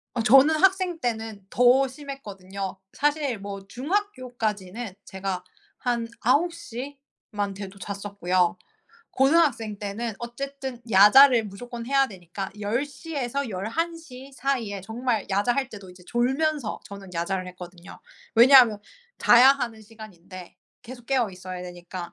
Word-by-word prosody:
어 235 - 0
저는 270 +7 +6
학생 375 -3 +3
때는 220 -4 -3
더 250 +2 +4
심했거든요. 200 -9 -7 0.2
사실 290 -6 0
뭐 195 -1 -8
중학교까지는 245 - -3
제가 190 -2 -4 0.4
한 240 -2 -1
9:00만 270 - -2
돼도 195 0 -9
잤었고요. 185 -3 -1 0.6
고등학생 265 -8 +2
때는 215 +2 -4
어쨌든 265 +1 -6
야자를 230 +5 +7
무조건 235 +4 -8
해야 275 0 +3
되니까 190 0 -7
10:00에서 275 +3 -3
11:00 270 - -5
사이에 235 -8 -2
정말 225 +2 -2
야자 205 +5 +2
할 270 -2 -1
때도 200 -5 -11
이제 180 0 -16
졸면서 265 +1 0
저는 195 -2 -11
야자를 185 +2 -2
했거든요. 180 0 -11 0.3
왜냐하면 240 -3 +7 0.4
자야 245 +3 +7
하는 235 -5 -4
시간인데 195 -5 -12 0.3
계속 245 0 -11
깨어있어야 185 -8 -2
되니까. 175 0 -8
230 Hz, 270 characters per minute, -25 LUFS, 195-270 Hz, 0.6 s, 야자를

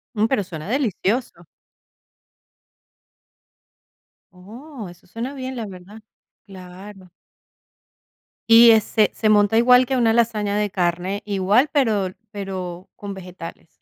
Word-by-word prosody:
Mm, 215 +1 +2
pero 265 -6 0
suena 160 -1 -8
delicioso. 225 -6 -2 2.9
Oh, 220 +6 -11
eso 175 - -18
suena 235 +8 -6
bien, 260 -1 -6
la 230 -2 -4
verdad, 195 +3 -12 0.4
claro. 190 0 -12 1.4
Y 230 +1 +9
ese 220 -1 +3
se 215 - 0
monta 210 +1 +4
igual 250 +1 +6
que 260 +1 -1
una 225 -2 +3
lasaña 215 -3 0
de 210 -1 0
carne, 180 +2 -2
igual, 205 +7 +2
pero 215 -10 0 0.2
pero 185 -3 -6
con 205 -1 -7
vegetales. 180 -3 -10
205 Hz, 115 wpm, -21 LUFS, 185-230 Hz, 2.9 s, Y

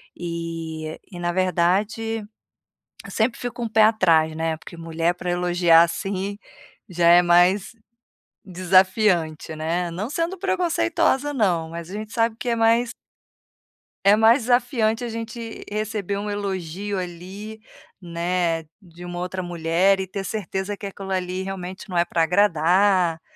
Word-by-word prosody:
e 165 -2 -5
e 175 - -8
na 175 0 -1
verdade, 195 +5 0 0.8
eu - - -9
sempre 230 +2 0
fico 245 -1 -4
com 230 - -1
pé 220 0 +4
atrás, 165 -8 +3
né, 160 0 -1
porque 170 - -12
mulher 165 +1 -1
pra 180 0 -4
elogiar, 175 -1 +4
assim, 195 +3 -2 0.5
já 175 -1 +2
é 175 +1 +7
mais 180 +3 +3 0.7
desafiante, 185 -3 +2
né. 170 +3 -2
Não 195 +7 -4
sendo 340 +4 -2
preconceituosa, 335 -5 +1
não, 175 -9 +1
mas 170 +1 -7
a - - -7
gente 215 +1 -6
sabe 230 -1 +1
que 245 - -3
é 235 - +1
mais 230 +1 +3 1.1
é 200 +1 +7
mais 225 +3 +5
desafiante 245 -2 +1
a 240 - -3
gente 230 0 -6
receber 210 -2 -3
um 205 +1 -4
elogio 200 -1 -3
ali, 185 +5 -7 0.4
né, 170 -1 -1 0.2
de 175 -1 -14
uma 175 0 -6
outra 180 +1 -4
mulher 175 +3 +2
e 190 - -3
ter 195 +1 -5
certeza 195 0 -4
que 200 - -8
aquilo 195 0 -8
ali, 185 0 -2
realmente 190 0 -7
não 180 - -2
é 170 - +3
pra 165 -1 +1
agradar, 180 -1 +3
185 Hz, 145 wpm, -23 LUFS, 170-215 Hz, 1.1 s, é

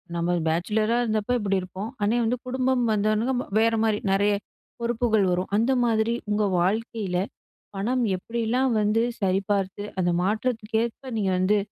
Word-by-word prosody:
நம்ம 170 +1 0
பேச்சிலரா 210 +8 +1
இருந்தப்ப 220 +1 0
இப்டி 200 -2 0
இருப்போம். 185 +4 -6
ஆனா 210 +4 +2
வந்து 235 +2 0
குடும்பம் 260 0 +1
வந்தவன்னே 215 +4 +1 0.3
வேற 225 +1 +3
மாரி 220 -2 +2
நெறைய 200 +1 +3 0.5
பொறுப்புகள் 235 -3 +1
வரும். 180 +1 -1
அந்த 230 +5 +2
மாதிரி 225 0 +1 0.2
உங்க 210 0 +1 0.2
வாழ்க்கையில 205 -1 -1 0.6
பணம் 245 +6 0
எப்டிலாம் 235 +6 -1
வந்து 210 +2 +2 0.2
சரிபார்த்து 195 0 0 0.2
அந்த 175 -1 +2
மாற்றத்துக்கேற்ப 225 +4 -1
நீங்க 195 -3 +1
வந்து 195 +3 +3
215 Hz, 135 wpm, -25 LUFS, 195-230 Hz, 0.6 s, வேற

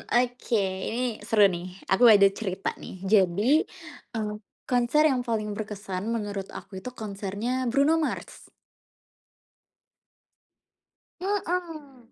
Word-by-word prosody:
Oke, 245 -1 +1 0.3
ini 240 -1 -2
seru 215 -2 +5
nih, 175 +1 -5 0.2
aku 190 +6 +4
ada 205 -3 +8
cerita 195 -2 -3
nih. 185 +1 -10
Jadi, 195 -1 +3 0.7
eee, 215 -1 -2 0.3
konser 250 +5 +2
yang 250 -1 0
paling 215 -2 -1
berkesan 205 -2 -5
menurut 205 -4 -3
aku 190 -2 -8
itu 250 - -6
konsernya 215 +4 -3
Bruno 280 +6 +3
Mars. 310 - -4 2.7
Mhm. 330 - -3
225 Hz, 105 wpm, -26 LUFS, 200-255 Hz, 2.7 s, ada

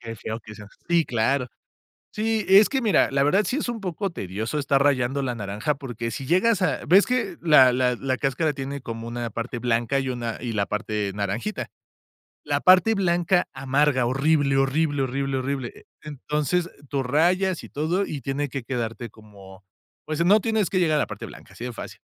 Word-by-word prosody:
que 115 -2 -8
que 115 - -6
feo 110 +2 -5
que 110 - -10
seas 105 -1 -12 0.2
así, 170 -1 +2
claro. 125 +3 0 0.7
Sí, 220 0 -1
es 200 +2 +7
que 270 - 0
mira, 215 -8 +3
la 140 0 +2
verdad 190 +9 +3
sí 255 - -1
es 295 - -2
un 230 - -5
poco 190 0 -3
tedioso 110 - -4
estar 140 -1 +2
rayando 135 -1 +1
la 125 -2 -2
naranja, 105 +7 -2
porque, 120 -4 -5
si 135 +1 -6
llegas 185 - +3
a 180 - 0
ves 190 +7 +6
que 250 0 -1
la 140 -6 +6
la 125 0 +1
la 130 0 -2
cáscara 145 +3 0
tiene 140 0 -6
como 115 0 -6
una 120 0 -4
parte 115 +2 -5
blanca 120 +3 0
y 130 -1 -3
una 120 -2 -4
y 120 -2 -4
la 100 -2 0
parte 105 -1 -2
naranjita. 105 - -3 0.7
La - - 0
parte 185 +5 +5
blanca 175 -1 +1
amarga, 135 -2 +1
horrible, 140 +1 +2
horrible, 145 +1 +1
horrible, 135 +1 -2
horrible. 130 -1 -4 0.2
Entonces, 150 +4 -2 0.2
tú 140 -2 -1
rayas, 175 +7 +1
y - - -10
todo 170 +7 -1
y 145 -3 -5
tiene 140 +1 -2
que 135 -2 -5
quedarte 115 -2 -4
como, 100 -3 -15 0.4
pues, 155 +2 -1
no 205 +4 +6
tienes 220 -3 0
que 185 - +1
llegar 160 -4 +2
a - - +2
la - - -1
parte 105 -1 -7
blanca, - - -14
así - - -9
de 125 - -4
fácil. - - -9
135 Hz, 200 wpm, -24 LUFS, 120-170 Hz, 0.7 s, es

